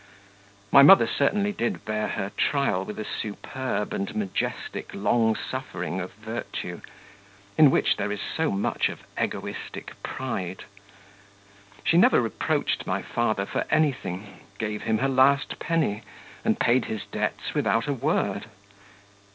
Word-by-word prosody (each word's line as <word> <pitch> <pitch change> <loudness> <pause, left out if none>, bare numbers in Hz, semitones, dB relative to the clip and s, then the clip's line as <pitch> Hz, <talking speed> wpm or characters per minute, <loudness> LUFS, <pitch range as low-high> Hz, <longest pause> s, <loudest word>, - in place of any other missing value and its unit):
My 140 - +9
mother 190 +8 +9
certainly 205 0 +1
did 120 -12 -2
bear 110 0 -1
her 100 - -3
trial 140 -10 +1
with 105 - -6
the 110 - -5
superb 110 +1 -3
and 100 - -3
majestic 100 -3 -3
long 110 +2 +2
suffering 95 -9 -4
of 90 - -6
virtue, 110 +3 -6 0.7
in 155 -3 +8
which - - +2
there 105 - -1
is 105 - -3
so 160 +7 -1
much 100 +1 0
of - - -8
egoistic - - -4
pride. 95 -9 -4 1.2
She 165 - +3
never 180 - +6
reproached 115 -4 -1
my - - -1
father 110 -4 0
for - - -2
anything, 105 - 0 0.2
gave 105 0 -3
him 110 - +1
her 135 - +1
last 135 +1 +3
penny, 160 -11 0 0.4
and - - +1
paid 120 +1 +3
his 110 - -4
debts - - -3
without 115 +1 +1
a 145 - +1
word. 125 - -1
110 Hz, 135 wpm, -26 LUFS, 100-135 Hz, 1.2 s, My